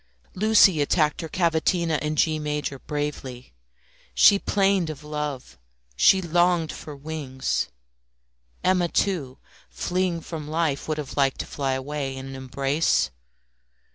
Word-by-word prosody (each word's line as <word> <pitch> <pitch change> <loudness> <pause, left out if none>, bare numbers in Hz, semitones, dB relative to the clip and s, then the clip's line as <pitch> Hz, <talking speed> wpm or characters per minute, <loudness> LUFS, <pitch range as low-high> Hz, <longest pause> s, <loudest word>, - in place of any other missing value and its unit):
Lucie 205 -5 +5
attacked 150 +1 +1
her 165 - -6
cavatina 165 -1 +1
in 150 0 -2
G 155 0 +2
major 150 -2 -3
bravely. 135 - -5 0.6
She 200 - +7
plained 195 -5 +1
of 155 -1 -7
love; 150 - -5 0.4
she 190 - +5
longed 175 -1 +2
for 150 - -9
wings. 140 -3 -3 1.0
Emma, 180 -1 +3
too, 160 -8 -1 0.3
fleeing 175 - -1
from 155 -2 -7
life, 155 -3 -1
would 155 -1 -1
have 150 -2 -6
liked 135 -2 +2
to - - -6
fly 135 -2 -2
away 135 0 -4
in 130 - -7
an 135 0 -8
embrace. 135 - 0
150 Hz, 130 wpm, -24 LUFS, 140-170 Hz, 1.0 s, She